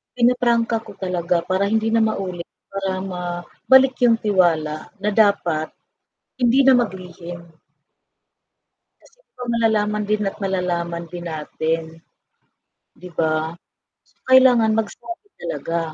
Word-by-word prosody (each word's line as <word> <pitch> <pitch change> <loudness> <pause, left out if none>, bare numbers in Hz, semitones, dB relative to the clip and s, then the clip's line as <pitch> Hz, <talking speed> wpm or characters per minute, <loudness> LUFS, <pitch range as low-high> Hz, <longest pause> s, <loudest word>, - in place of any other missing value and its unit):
pinapa-prangka 235 -1 +2
ko - - -9
talaga 180 -1 0
para 190 +2 +2
hindi 220 0 +1
na 225 0 +3
maulit, 185 -4 -4 0.3
para 195 -1 -2 0.2
mabalik 180 +10 +2
yung 230 -1 +5
tiwala 170 -7 +2 0.3
na 210 - +1
dapat 170 -6 +1 0.7
hindi 245 +3 +4
na 270 - +7
mag-lihim. 180 -4 -7 1.7
Kasi - - -24 0.2
'pag 250 -1 -4
malalaman 210 -2 +1
din 215 0 +1
at - - -15
malalaman 175 -3 -2
din 175 0 -6
natin. 160 +1 -2 1.2
Di 180 - -9
ba? 160 0 0 0.5
So - - -32 0.2
kailangan 245 -4 +6
magsabi 345 - -5 0.2
talaga. 170 - -3
195 Hz, 115 wpm, -21 LUFS, 175-230 Hz, 1.7 s, na